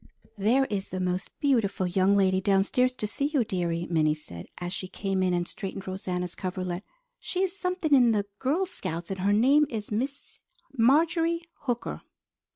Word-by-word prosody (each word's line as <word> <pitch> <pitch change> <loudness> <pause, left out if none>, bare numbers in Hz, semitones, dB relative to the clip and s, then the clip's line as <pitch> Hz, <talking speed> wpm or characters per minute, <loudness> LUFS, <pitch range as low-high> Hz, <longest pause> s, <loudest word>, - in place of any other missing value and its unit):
"There 240 +7 +3
is 205 -5 -3
the 185 - -4
most 180 0 -1
beautiful 230 -9 +1
young 190 +2 +3
lady 190 -1 +3
downstairs 205 +6 +2
to 215 - -3
see 250 +6 -1
you, 290 -4 +1
dearie," 175 -5 -1
Minnie 155 -3 +2
said, 85 - -10
as 175 0 -4
she 185 - -4
came 195 0 -2
in 185 -1 +2
and 175 0 0
straightened 195 0 -6
Rosanna's 180 -2 -3
coverlet. 185 0 -4 0.4
"She 370 +1 -1
is 380 0 -1
something 360 -5 -1
in 245 -4 +6
the 205 -2 +1
Girl 305 +9 +1
Scouts, 170 - -5
and 190 - -4
her 195 +2 +2
name 275 +8 +5
is 215 -2 -5
Miss 265 +6 -3 0.3
Marjorie 330 +7 +3
Hooker." 245 -4 -4
200 Hz, 170 wpm, -27 LUFS, 185-270 Hz, 0.4 s, in